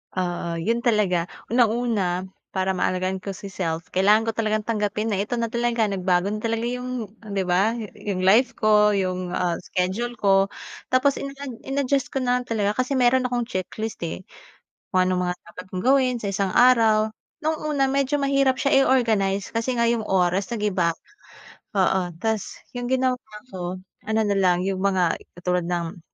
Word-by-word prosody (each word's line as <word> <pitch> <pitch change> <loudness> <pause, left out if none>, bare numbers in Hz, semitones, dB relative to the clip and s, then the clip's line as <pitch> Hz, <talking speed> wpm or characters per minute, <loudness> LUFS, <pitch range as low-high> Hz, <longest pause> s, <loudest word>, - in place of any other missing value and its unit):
Oo, 175 -2 -2
'yon 230 +7 0
talaga. 200 -7 +2 0.2
Unang-una 220 -6 +1 0.2
para 190 0 0
maalagaan 185 +1 -1
ko 195 - -4
si 195 +1 -8
self, 170 -3 -3
kailangan 210 +4 +4
ko - - +2
talagang 215 -1 +1
tanggapin 215 0 -1
na 210 - 0
ito 235 +2 -3
na 230 - 0
talaga, 235 -1 0
nagbago 185 -1 +1
na 215 +2 -3
talaga 230 +1 -1
'yong, 250 -2 -4 0.2
'di 195 -1 0
ba, 190 +5 +3
yo 215 - -5
'yong 195 -3 -4
life 240 +6 +5
ko, 210 -1 +5
'yong, 185 -2 -1
ah, 175 -2 0
schedule 220 +6 -2
ko 195 0 +3 0.4
tapos 265 +2 +3
in-ad 275 -3 -7
in-adjust 275 0 0
ko 270 - -1
na 250 0 +1
talaga 210 -4 -1
kasi 255 - -10
meron 250 +1 +4
akong 245 -2 -1
checklist 210 0 -4
eh. 165 - -4 0.7
Kung 185 -1 +3
anong 180 -1 0
mga 180 - -1
dapat 180 - -10
kong 185 +2 -5
gawin 260 -2 +3
sa 200 -4 -3
isang 195 -1 -1
araw. 220 -3 +5 0.3
No'ng 310 -1 -1
una 275 -2 +2
medyo 275 +1 +1
mahirap 275 -2 +2
siya 275 - 0
i-organize 205 -6 +1
kasi 235 +2 -1
nga 235 - +2
'yong 230 -2 0
oras 185 +1 +1
nag-iba. 195 -7 0 0.8
Oo, 190 0 +3 0.2
tas 220 -3 -1 0.2
yung 245 -1 -4
ginawa 255 -1 +1 0.3
ko, 180 -1 -4 0.3
ano 220 0 +1
na 205 -1 +1
lang 180 -1 +3
'yong 190 -1 -1
mga 190 -3 +1 0.2
katulad 180 0 -1
ng 175 +1 -3
210 Hz, 170 wpm, -24 LUFS, 185-240 Hz, 0.8 s, life